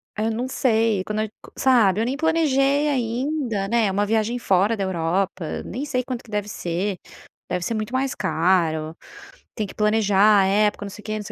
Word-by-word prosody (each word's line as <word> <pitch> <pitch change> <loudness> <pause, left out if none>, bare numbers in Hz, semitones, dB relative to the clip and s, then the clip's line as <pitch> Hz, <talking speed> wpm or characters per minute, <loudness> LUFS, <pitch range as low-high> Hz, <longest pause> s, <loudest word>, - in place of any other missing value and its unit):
aí 215 - -1
eu - - 0
não 240 +3 -2
sei, 225 -6 +1
quando 210 +2 -3
age 215 -1 -2
qua - - -15
sabe 225 -7 +4
eu 225 - +1
nem 255 +3 -1
planejei 290 -2 +2
ainda, 250 -4 -1
né. 235 +1 +2
É - - 0
uma 205 +2 +1
viagem 220 +2 0
fora 200 +1 +2
da 200 - -1
Europa, 185 -1 -2
nem 265 - -5
sei 255 -3 -1
quanto 250 -2 -5
que - - -19
deve 210 -1 -2
ser, 185 0 -3 0.5
deve 180 -1 -2
ser 230 - -2
muito 215 +1 -3
mais 265 +1 0
caro. 165 -4 +1 0.6
Tem 215 -3 -2
que - - -12
planejar 210 -1 +4
a - - +3
época, 205 +1 +1
não - - -6
sei 210 +2 -11
quê, 215 - -4
não 210 - -5
sei - - -9
215 Hz, 210 wpm, -23 LUFS, 195-245 Hz, 0.6 s, sabe